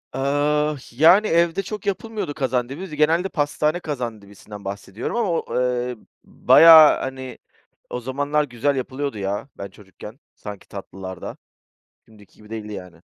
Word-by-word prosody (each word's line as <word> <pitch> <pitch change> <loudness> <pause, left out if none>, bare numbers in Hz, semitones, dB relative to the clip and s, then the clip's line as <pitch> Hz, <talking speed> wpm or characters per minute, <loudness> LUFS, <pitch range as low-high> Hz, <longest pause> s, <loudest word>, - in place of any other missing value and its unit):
Iıı, 145 +2 +1
h 130 - -16
yani, 185 +7 +7
evde 170 +2 +2
çok 210 +1 -7
yapılmıyordu 200 -4 -3
kazandibi, 130 +5 -2
z - - -15
genelde 165 +5 +2
pastane 150 +2 0
kazandibisinden 105 - -7
bahsediyorum 100 - -5
ama 230 -5 0
o, 165 - -1
ııı, 125 0 -1 0.3
bayağı, 160 -2 +7
hani, 130 -1 -6 0.5
o 125 - -4
zamanlar 145 +4 -1
güzel 140 +2 -1
yapılıyordu 135 -1 -4
ya, 100 +7 -3
ben 100 - -7
çocukken 105 +5 -13 0.2
sanki 105 -2 -10
tatlılar 95 -2 -9
da, - - -7 0.7
şimdiki 105 -3 -20
gibi 105 0 -17
değildi 105 -1 -6
yani. 90 -4 -10
130 Hz, 140 wpm, -22 LUFS, 105-155 Hz, 0.7 s, yani